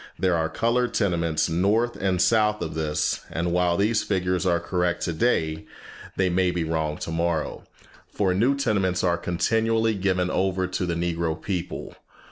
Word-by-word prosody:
There 90 Hz, -2 st, +2 dB
are 80 Hz, -1 st, 0 dB
colored 115 Hz, +5 st, 0 dB
tenements 85 Hz, -6 st, +1 dB
north 100 Hz, +8 st, +1 dB
and 95 Hz, -2 st, 0 dB
south 105 Hz, 0 st, +3 dB
of 80 Hz, -, -5 dB
this; 80 Hz, -1 st, -1 dB
and 85 Hz, +1 st, -2 dB
while 90 Hz, 0 st, +2 dB
these 105 Hz, +2 st, +2 dB
figures 90 Hz, -2 st, 0 dB
are 85 Hz, -1 st, +2 dB
correct 90 Hz, -1 st, -1 dB
today, 80 Hz, -4 st, 0 dB, 0.5 s
they 95 Hz, -, +2 dB
may 90 Hz, 0 st, +2 dB
be 90 Hz, -1 st, -1 dB
wrong 80 Hz, -1 st, -1 dB
tomorrow, 85 Hz, -1 st, -2 dB, 0.5 s
for 95 Hz, -3 st, +1 dB
new 120 Hz, +9 st, +2 dB
tenements 100 Hz, -9 st, 0 dB
are 85 Hz, -2 st, +3 dB
continually 110 Hz, +6 st, +1 dB
given 95 Hz, -2 st, 0 dB
over 95 Hz, -1 st, 0 dB
to 90 Hz, 0 st, -2 dB
the 85 Hz, -, -1 dB
Negro 85 Hz, -1 st, -1 dB
people. 90 Hz, 0 st, -4 dB
90 Hz, 155 wpm, -25 LUFS, 85-100 Hz, 0.5 s, south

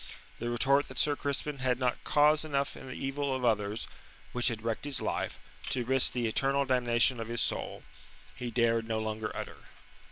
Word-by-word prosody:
The 120 Hz, -, -2 dB
retort 135 Hz, +4 st, +2 dB
that 130 Hz, -, -10 dB
Sir 145 Hz, +2 st, +3 dB
Crispin 145 Hz, 0 st, -2 dB
had 130 Hz, -1 st, +1 dB
not 125 Hz, -1 st, -1 dB
cause 150 Hz, +1 st, +4 dB
enough 140 Hz, -3 st, -1 dB
in -, -, -10 dB
the 130 Hz, -, -6 dB
evil 135 Hz, 0 st, -2 dB
of 130 Hz, -1 st, -2 dB
others, 105 Hz, -1 st, 0 dB, 0.5 s
which 125 Hz, 0 st, +1 dB
had 115 Hz, -3 st, -1 dB
wrecked 115 Hz, -1 st, -2 dB
his 145 Hz, -2 st, +4 dB
life, -, -, -2 dB, 0.3 s
to 125 Hz, -2 st, 0 dB
risk 130 Hz, +1 st, +3 dB
the 120 Hz, -2 st, -1 dB
eternal 135 Hz, +5 st, +1 dB
damnation 125 Hz, -1 st, +3 dB
of 115 Hz, -, -4 dB
his 120 Hz, 0 st, -2 dB
soul, -, -, -2 dB, 0.5 s
he 125 Hz, -, -4 dB
dared 115 Hz, -1 st, +1 dB
no 110 Hz, -1 st, -1 dB
longer 110 Hz, 0 st, -3 dB
utter. -, -, -6 dB
125 Hz, 190 wpm, -30 LUFS, 115-140 Hz, 0.5 s, cause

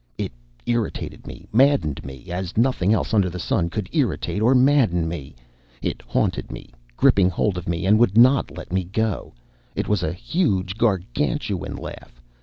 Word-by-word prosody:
It -, -, -3 dB, 0.3 s
irritated 120 Hz, -2 st, -3 dB
me, -, -, -10 dB
maddened 130 Hz, -, +3 dB
me, 65 Hz, +3 st, -10 dB
as 90 Hz, +1 st, -4 dB
nothing 115 Hz, -5 st, +2 dB
else 110 Hz, +1 st, 0 dB
under 100 Hz, -4 st, +3 dB
the 90 Hz, -, -7 dB
sun 85 Hz, -1 st, 0 dB
could 100 Hz, +1 st, -4 dB
irritate 100 Hz, -, -1 dB
or 125 Hz, +4 st, +4 dB
madden 125 Hz, -, +3 dB
me. 75 Hz, -5 st, -6 dB, 0.4 s
It -, -, -3 dB
haunted -, -, -1 dB
me, -, -, -9 dB, 0.3 s
gripped 100 Hz, -, +4 dB
hold 95 Hz, +2 st, +1 dB
of 90 Hz, -1 st, -5 dB
me, 85 Hz, +2 st, -1 dB
and 105 Hz, +3 st, +5 dB
would 115 Hz, -3 st, +3 dB
not 130 Hz, +3 st, +5 dB
let -, -, -9 dB
me 95 Hz, 0 st, +1 dB
go. 105 Hz, -, -2 dB, 0.4 s
It -, -, -2 dB
was 105 Hz, -4 st, +1 dB
a 80 Hz, -, -1 dB
huge, 95 Hz, -, -1 dB
Gargantuan 110 Hz, -, -1 dB
laugh. -, -, -9 dB
100 Hz, 170 wpm, -23 LUFS, 90-120 Hz, 0.4 s, and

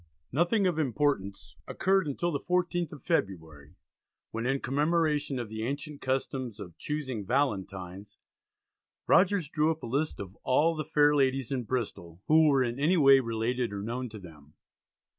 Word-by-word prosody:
Nothing 175 Hz, -, +2 dB
of 175 Hz, -4 st, +1 dB
importance 135 Hz, -8 st, -1 dB
occurred 190 Hz, -2 st, +1 dB
until 170 Hz, +5 st, -1 dB
the 140 Hz, -, -1 dB
14th 175 Hz, -1 st, -1 dB
of 145 Hz, -4 st, -11 dB
February, 80 Hz, -, -3 dB, 0.6 s
when 115 Hz, +2 st, -3 dB
"in 135 Hz, +1 st, +1 dB
commemoration 150 Hz, 0 st, 0 dB
of 120 Hz, -2 st, -4 dB
the 110 Hz, +1 st, -6 dB
ancient 140 Hz, +4 st, -4 dB
custom 130 Hz, -1 st, -2 dB
of 90 Hz, -6 st, -9 dB
chusing 130 Hz, -8 st, -3 dB
Valentines," 100 Hz, -6 st, -2 dB, 0.9 s
Rogers 185 Hz, -3 st, +3 dB
drew 155 Hz, +1 st, +1 dB
up 160 Hz, 0 st, -6 dB
a -, -, -3 dB
list 140 Hz, +6 st, -2 dB
of 95 Hz, -1 st, -8 dB
all 155 Hz, +6 st, +2 dB
"the 155 Hz, -, -3 dB
fair 150 Hz, -1 st, +3 dB
ladies 135 Hz, -2 st, +1 dB
in 125 Hz, -3 st, -2 dB
Bristol" 100 Hz, -9 st, -4 dB
who 160 Hz, 0 st, +5 dB
were 135 Hz, -3 st, +4 dB
in 120 Hz, +1 st, -3 dB
any 165 Hz, +6 st, +3 dB
way 135 Hz, -3 st, +7 dB
related 115 Hz, 0 st, -1 dB
or 100 Hz, 0 st, -4 dB
known 120 Hz, +3 st, -4 dB
to 110 Hz, -, -9 dB
them. 80 Hz, -6 st, -14 dB
135 Hz, 160 wpm, -29 LUFS, 110-155 Hz, 0.9 s, way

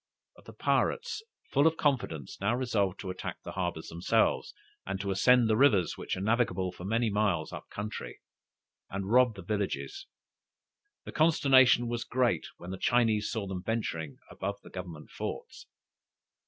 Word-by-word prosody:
But -, -, -19 dB
the -, -, -11 dB
pirates, 470 Hz, -2 st, 0 dB, 0.3 s
full 145 Hz, +3 st, +4 dB
of 160 Hz, 0 st, +1 dB
confidence, 115 Hz, -, -1 dB
now 105 Hz, +4 st, +2 dB
resolved 105 Hz, -7 st, 0 dB
to 95 Hz, -, -4 dB
attack 90 Hz, -, -6 dB
the -, -, -6 dB
harbors 85 Hz, -3 st, -3 dB
themselves, 85 Hz, +2 st, +1 dB, 0.3 s
and 95 Hz, 0 st, -4 dB
to 100 Hz, 0 st, -2 dB
ascend 120 Hz, +5 st, +5 dB
the 110 Hz, -, +3 dB
rivers, 110 Hz, -8 st, +4 dB
which -, -, -4 dB
are -, -, -4 dB
navigable 105 Hz, -4 st, +1 dB
for 90 Hz, -, -10 dB
many 115 Hz, +2 st, +1 dB
miles 105 Hz, 0 st, 0 dB
up -, -, -7 dB
the -, -, -16 dB
country, 105 Hz, +1 st, -5 dB, 0.7 s
and 95 Hz, +1 st, -4 dB
rob 125 Hz, -2 st, +5 dB
the 95 Hz, -, -9 dB
villages. 105 Hz, -, -3 dB, 1.0 s
The -, -, -7 dB
consternation 135 Hz, -6 st, +5 dB
was 120 Hz, 0 st, -2 dB
great 120 Hz, -9 st, +1 dB
when 90 Hz, -, -8 dB
the 95 Hz, -, -6 dB
Chinese 115 Hz, -3 st, +2 dB
saw 110 Hz, -4 st, -2 dB
them 95 Hz, -2 st, -4 dB
venturing 85 Hz, -9 st, -3 dB
above 100 Hz, +1 st, -3 dB
the -, -, -13 dB
government 85 Hz, -5 st, -8 dB
forts. -, -, -6 dB
105 Hz, 165 wpm, -30 LUFS, 95-120 Hz, 1.0 s, ascend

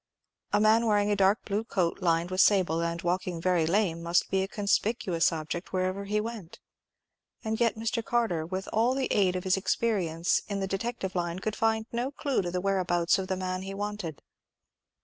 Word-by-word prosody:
A 205 Hz, -, +3 dB
man 220 Hz, +2 st, +4 dB
wearing 205 Hz, -1 st, +2 dB
a -, -, +3 dB
dark 195 Hz, +3 st, +2 dB
blue 205 Hz, +2 st, -1 dB
coat 185 Hz, -5 st, -1 dB
lined 170 Hz, 0 st, +1 dB
with 185 Hz, +1 st, +3 dB
sable, 180 Hz, -5 st, +3 dB
and 170 Hz, 0 st, -2 dB
walking 180 Hz, 0 st, -1 dB
very 170 Hz, -2 st, +2 dB
lame, 170 Hz, -2 st, +1 dB
must 170 Hz, +1 st, +1 dB
be 190 Hz, -, +2 dB
a 190 Hz, -, -1 dB
conspicuous 200 Hz, -4 st, +1 dB
object 160 Hz, +2 st, -5 dB
wherever 185 Hz, +2 st, -1 dB
he 210 Hz, +1 st, 0 dB
went; 215 Hz, -6 st, -6 dB, 0.8 s
and 220 Hz, 0 st, -2 dB
yet 235 Hz, -2 st, +2 dB
Mr. 225 Hz, +1 st, -2 dB
Carter, 225 Hz, -9 st, 0 dB
with 185 Hz, +4 st, -5 dB
all 235 Hz, +4 st, +2 dB
the 265 Hz, -1 st, -1 dB
aid 185 Hz, -3 st, +2 dB
of 180 Hz, -, -3 dB
his 190 Hz, 0 st, +2 dB
experience 180 Hz, -5 st, 0 dB
in 200 Hz, -1 st, -3 dB
the 195 Hz, -, -1 dB
detective 195 Hz, 0 st, -3 dB
line, 175 Hz, -1 st, -2 dB
could 215 Hz, +3 st, -3 dB
find 220 Hz, 0 st, +1 dB
no 240 Hz, +3 st, -1 dB
clue 280 Hz, -3 st, -1 dB
to 175 Hz, -, -3 dB
the 180 Hz, +1 st, -2 dB
whereabouts 185 Hz, -2 st, +1 dB
of 190 Hz, -, -3 dB
the 190 Hz, 0 st, -1 dB
man 185 Hz, 0 st, -3 dB
he 195 Hz, +1 st, -6 dB
wanted. 205 Hz, -6 st, -5 dB
190 Hz, 195 wpm, -28 LUFS, 175-215 Hz, 0.8 s, man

